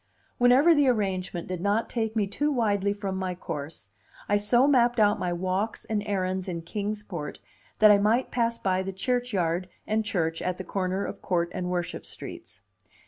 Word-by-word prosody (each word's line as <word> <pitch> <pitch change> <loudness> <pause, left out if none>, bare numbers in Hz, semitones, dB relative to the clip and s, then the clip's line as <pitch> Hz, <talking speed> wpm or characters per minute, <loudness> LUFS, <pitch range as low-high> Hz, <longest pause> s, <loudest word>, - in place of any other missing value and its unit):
Whenever 255 +7 +6
the 290 -3 +3
arrangement 190 -7 -1
did 180 -2 -4
not 205 +4 +1
take 225 -2 -2
me 215 -2 +2
too 290 +10 -1
widely 205 -6 +1
from 200 -2 -3
my 185 -1 -2
course, 145 - -7 0.4
I 205 - +3
so 240 +5 +3
mapped 245 -4 +3
out 210 -1 +4
my 180 - -1
walks 185 +5 -2
and 215 -2 -1
errands 185 -2 -1
in 170 -2 -4
Kings 210 +4 -3
Port 170 -8 -6 0.4
that 215 -1 +7
I 205 - +6
might 220 +5 +2
pass 235 -1 0
by 190 -3 0
the 190 0 -4
churchyard 190 -6 -1 0.2
and 220 +1 0
church 165 -6 -1
at 180 0 -2
the 185 - -5
corner 185 +1 -2
of - - -7
Court 170 -2 0
and 180 -2 -3
Worship 175 -1 -3
streets. - - -9
200 Hz, 185 wpm, -27 LUFS, 180-220 Hz, 0.4 s, that